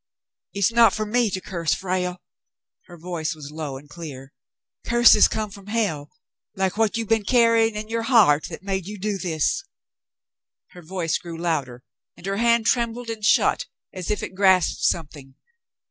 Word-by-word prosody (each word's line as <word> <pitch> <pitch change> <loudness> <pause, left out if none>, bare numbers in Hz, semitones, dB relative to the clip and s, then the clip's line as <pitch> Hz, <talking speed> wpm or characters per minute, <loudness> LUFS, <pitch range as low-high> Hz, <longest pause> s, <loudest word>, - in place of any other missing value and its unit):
"It's 200 +3 +1
not 230 0 +5
for 215 - -2
me 235 +1 +1
to 185 - -3
curse, 170 -4 -2
Frale." 180 -1 -3 0.6
Her 175 -1 -12
voice 165 -2 -4
was 150 -2 -10
low 150 -3 -5
and 145 +2 -14
clear. 145 -4 -10 0.5
"Curses 240 0 +6
come 215 -2 -4
from 200 0 -13
hell, 200 -10 -2 0.5
like 190 -1 -1
what 220 0 +1
you 230 - -2
been 225 0 +1
carrying 230 -1 +3
in 215 0 -5
your 230 +1 -2
heart 215 - +4
that - - -9
made 190 -2 -3
you 210 +1 -7
do 200 0 -3
this." 160 -4 -1 1.1
Her 180 - -13
voice 170 -1 -2
grew 170 -2 -8
louder, 140 -7 -3 0.3
and - - -13
her 195 0 -2
hand 235 0 +3
trembled 235 0 0
and 220 -2 -8
shut 215 - +3 0.3
as 185 -2 -6
if 210 - -1
it - - -6
grasped 185 -2 +3
something. 145 -5 -2
190 Hz, 170 wpm, -23 LUFS, 165-225 Hz, 1.1 s, Curses